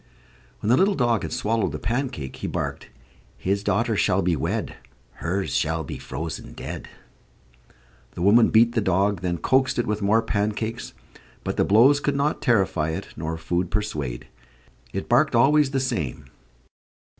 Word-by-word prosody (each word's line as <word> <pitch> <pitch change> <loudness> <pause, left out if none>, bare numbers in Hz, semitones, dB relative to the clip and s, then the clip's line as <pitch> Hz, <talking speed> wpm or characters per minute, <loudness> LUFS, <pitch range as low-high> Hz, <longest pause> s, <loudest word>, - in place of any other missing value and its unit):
When 105 - +1
the 125 - +5
little 195 +1 +3
dog 120 -4 +1
had - - -5
swallowed 110 0 0
the - - -3
pancake, 115 - -3
he - - -4
barked: - - -4 0.5
"His 100 +2 -1
daughter 105 +3 +1
shall 95 -1 +2
be 85 -1 +2
wed; 70 - -3 0.4
Her's 95 +3 -2
shall 80 -1 0
be - - -7
frozen 80 +4 -6
dead." - - -7 1.3
The 85 - -4
woman 110 +4 +6
beat 115 +1 +5
the 115 - +1
dog, 95 0 +1
then 90 -2 -1
coaxed 130 +8 +2
it 120 - +1
with 105 0 -2
more 110 +3 +3
pancakes; 110 +3 -2 0.5
but - - -3
the - - +2
blows 125 +8 +5
could 145 -1 -1
not 140 +2 0
terrify 95 - +2
it 80 - -5
nor 80 +1 -4
food 85 +2 -2
persuade. 75 - -3 0.7
It - - -4
barked - - +3
always 150 0 +4
the 135 0 -1
same. 115 - -3
105 Hz, 160 wpm, -24 LUFS, 85-120 Hz, 1.3 s, woman